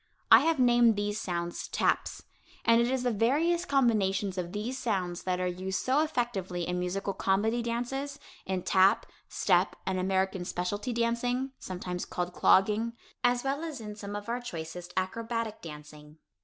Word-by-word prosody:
I - - +11
have 325 +1 +2
named 240 -3 +5
these 205 +1 -2
sounds 170 -1 -3
"taps," - - 0 0.4
and 230 0 +5
it 235 - +2
is 260 -1 0
the 245 - +2
various 305 - +2
combinations 210 - +2
of 175 -2 -3
these 225 +6 -3
sounds 185 -7 -1
that 180 -1 0
are 185 - 0
used 185 +1 -2
so 265 +3 +2
effectively 220 - -1
in 180 0 -1
musical 195 +2 -2
comedy 215 +6 +1
dances, 245 +4 -3 0.3
in 185 -1 -1
tap, 190 +1 +4 0.2
step, - - +2
and 190 -1 -1
American 190 0 0
specialty 190 +7 -3
dancing 240 +3 0
(sometimes 180 -1 -5
called 180 0 -3
clogging), 215 +6 +3 0.3
as 245 0 +3
well 275 +3 -1
as 310 -5 -5
in 210 -2 -7
some 205 -1 -6
of 205 0 -6
our 240 +1 -2
choicest 175 -4 -7
acrobatic 225 +3 -2
dancing. 150 -1 -11
205 Hz, 160 wpm, -29 LUFS, 185-240 Hz, 0.4 s, I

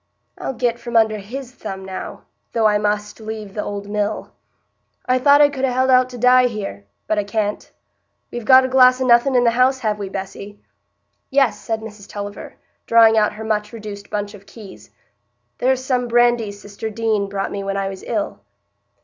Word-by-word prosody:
"I'll 265 - -4
get 240 0 -1
from 235 -1 -1
under 220 -1 +3
his 245 +6 -7
thumb 195 -5 -7
now, 190 -1 -7 0.3
though 225 -2 +1
I 210 -1 +4
must 210 +1 -2
leave 215 -2 -7
the 210 - -3
old 200 0 -5
mill. 210 +1 -2 0.7
I 255 0 +2
thought 285 +2 +6
I 290 - +6
could 270 -2 -6
ha' - - +4
held 260 +1 +2
out 255 0 +4
to 250 - -9
die 250 +1 +5
here—but 100 - -5
I - - 0
can't——we've 210 +2 -6
got 260 +2 +7
a - - 0
glass 255 0 +5
o' 260 - 0
nothing 245 +2 +4
in 245 - +4
the 235 - +4
house, 255 +3 +3
have 210 -2 -1
we, 200 -1 -4
Bessy?" 195 +1 -7 0.7
"Yes," 270 -3 +2
said 225 -1 -3
Mrs 210 -2 -11
Tulliver, 205 0 -7 0.3
drawing 230 -1 +6
out 215 -1 +2
her 215 +1 -8
much 210 -1 -1
reduced 210 -3 -9
bunch 205 0 -3
of 200 -1 -14
keys, 205 -5 -13 0.7
"there's 260 0 +1
some 250 -2 0
brandy 240 -2 +2
sister 205 +2 -7
Deane 215 -2 -1
brought 195 0 -3
me 200 -1 -4
when 195 0 -2
I 195 0 -1
was 195 -1 -7
ill." 310 -1 -3
220 Hz, 190 wpm, -20 LUFS, 205-250 Hz, 0.7 s, got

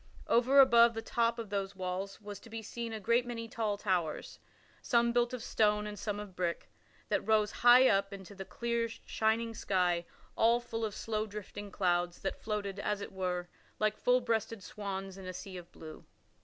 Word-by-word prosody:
Over 255 +4 +5
above 235 -3 +7
the 225 - -4
top 235 0 +1
of 225 -4 -6
those 200 -1 -2
walls 185 +1 -4
was 205 -1 -8
to 230 - -15
be 225 0 -6
seen 235 +1 -5
a 220 - -4
great 235 +4 +2
many 235 -2 -5
tall 220 -2 -2
towers 180 -6 -2 0.4
some 235 -1 +3
built 240 0 +2
of 250 -3 -5
stone 210 -1 +2
and 210 -1 -6
some 205 -1 -3
of 205 -3 -8
brick 175 -2 -2 0.4
that - - +2
rose 215 -1 +2
high 245 +2 +7
up 195 -2 +2
into 195 0 -9
the 195 -1 -7
clear, 235 +4 -2
shining 225 +1 -1
sky 180 -5 0 0.3
all 230 +2 +4
full 225 -1 -5
of 215 -2 -2
slow 215 -1 -2
drifting 205 0 -7
clouds, 175 -2 0
that 195 - -3
floated, 205 -2 -3
as 205 0 -1
it - - -6
were, 180 -2 -2 0.3
like 215 -1 +1
full 250 +2 +3
breasted 225 -3 -1
swans 195 -2 -5
in 190 - -8
a 185 - -5
sea 185 +1 -8
of 175 -1 -9
blue. 155 -1 -11
210 Hz, 195 wpm, -32 LUFS, 195-230 Hz, 0.4 s, above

